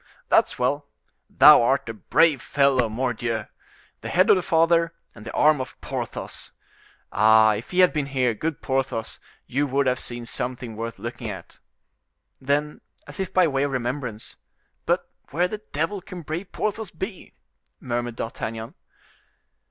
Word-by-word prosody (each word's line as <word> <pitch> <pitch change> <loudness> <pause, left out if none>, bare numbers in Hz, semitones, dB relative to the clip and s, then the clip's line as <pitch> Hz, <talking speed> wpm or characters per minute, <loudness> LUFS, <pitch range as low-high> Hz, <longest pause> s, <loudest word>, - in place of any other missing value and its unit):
"That's - - +3
well! 140 +3 0 0.4
Thou - - +8
art 135 +3 +1
a 115 - -4
brave 145 - +2
fellow, 135 -4 +2
mordioux! 115 -1 -2 0.6
The - - -5
head 185 +5 +4
of - - +7
the 185 - 0
father, 165 0 +2 0.2
and 105 -1 -13
the - - -6
arm 150 -2 +4
of 130 - -8
Porthos. - - -5 0.6
Ah! 110 +1 +5
if 105 +3 -6
he 185 0 +3
had 180 - +5
been 150 -3 -1
here, 130 -3 +1
good 155 +7 -4
Porthos, 130 -4 -2 0.3
you 145 +3 0
would 140 +1 +1
have 130 0 +1
seen 120 -1 -6
something 120 -1 -4
worth 115 +1 -5
looking 120 -1 -6
at." 95 -4 -9 0.8
Then 145 +2 -1 0.2
as - - -10
if 190 -2 -2
by 185 -2 +4
way 135 -3 0
of 140 0 0
remembrance— 125 -3 -4 0.5
"But - - +1 0.2
where 175 +5 +1
the 215 +3 -6
devil 165 +7 -1
can 180 0 -9
that - - -18
brave 170 +6 -5
Porthos 215 -1 -2
be?" 190 +3 -7 0.4
murmured 120 -1 -3
D'Artagnan. 115 0 -5
135 Hz, 160 wpm, -24 LUFS, 115-165 Hz, 0.8 s, Thou